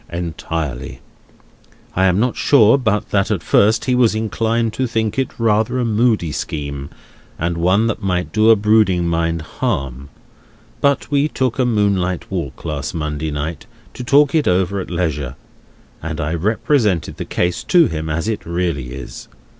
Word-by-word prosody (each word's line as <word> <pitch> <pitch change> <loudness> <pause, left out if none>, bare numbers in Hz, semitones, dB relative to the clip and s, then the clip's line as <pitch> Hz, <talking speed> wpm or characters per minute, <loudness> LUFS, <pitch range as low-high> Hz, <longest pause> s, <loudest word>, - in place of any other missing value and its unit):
"Entirely. 80 -6 -4 1.0
I 95 - +3
am 95 +1 +3
not 125 +2 +1
sure 130 -2 +5
but 110 -4 -1
that 100 +1 +1
at 100 -7 -1
first 110 +7 +3
he 130 - +1
was 120 -3 +3
inclined 110 +1 -1
to 130 - -1
think 110 0 -1
it 135 - 0
rather 110 +2 +1
a 125 - 0
moody 110 -6 +1
scheme, 70 -2 -5 0.5
and 85 +1 -1
one 95 +6 +2
that 115 -1 -2
might 90 -2 -2
do 110 +1 +4
a 115 - +8
brooding 105 -4 +3
mind 85 -1 -1
harm. 70 - -3 0.7
But 140 +1 +1
we 145 +1 +3
took 130 -4 -2
a 130 - +3
moonlight 100 -6 0
walk - - -5
last 75 0 -4
Monday 75 -1 -3
night, 75 +2 -4 0.3
to 125 - -7
talk 140 +3 +4
it 155 -3 +2
over 95 +2 +1
at 95 - -6
leisure, 75 -7 -2 0.7
and 80 -1 -5
I 75 +2 -2
represented 105 - 0
the - - -5
case 85 0 -1
to 175 -2 +5
him 80 - -3
as 80 +5 -2
it 110 -2 -2
really 85 -8 -2
is. 70 - -9
95 Hz, 165 wpm, -19 LUFS, 80-115 Hz, 1.0 s, a